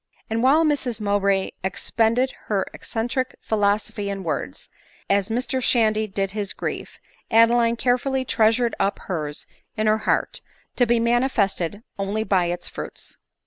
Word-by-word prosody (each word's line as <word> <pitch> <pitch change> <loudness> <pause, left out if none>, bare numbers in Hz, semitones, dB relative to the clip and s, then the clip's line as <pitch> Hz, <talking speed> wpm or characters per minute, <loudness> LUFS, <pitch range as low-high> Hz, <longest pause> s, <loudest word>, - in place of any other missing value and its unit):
And 225 +1 +1
while 290 +6 +5
Mrs 270 -7 0
Mowbray 200 -2 +1
expend 225 +4 +1
ed 260 +1 +2
her 200 -3 0
eccentric 250 +3 -3
philosophy 205 -1 0
in 195 -1 -4
words, 145 - -4 0.4
as 200 +1 +2
Mr 255 +3 -1
Shandy 220 -3 +2
did 195 -1 -2
his 205 -2 -3
grief, - - -5 0.3
Adeline 230 +1 +5
carefuDy 260 +2 0
treasured 230 +1 +3
up 200 +1 +1
hers 150 -5 -4 0.3
in 215 - 0
her 215 0 +3
heart, - - 0 0.4
to 245 - +4
be 235 0 +3
manifested 225 -5 +1 0.2
only 200 +2 -1
by 185 -5 +2
hs 175 0 -3
fruits. - - -9
220 Hz, 145 wpm, -23 LUFS, 200-240 Hz, 0.4 s, while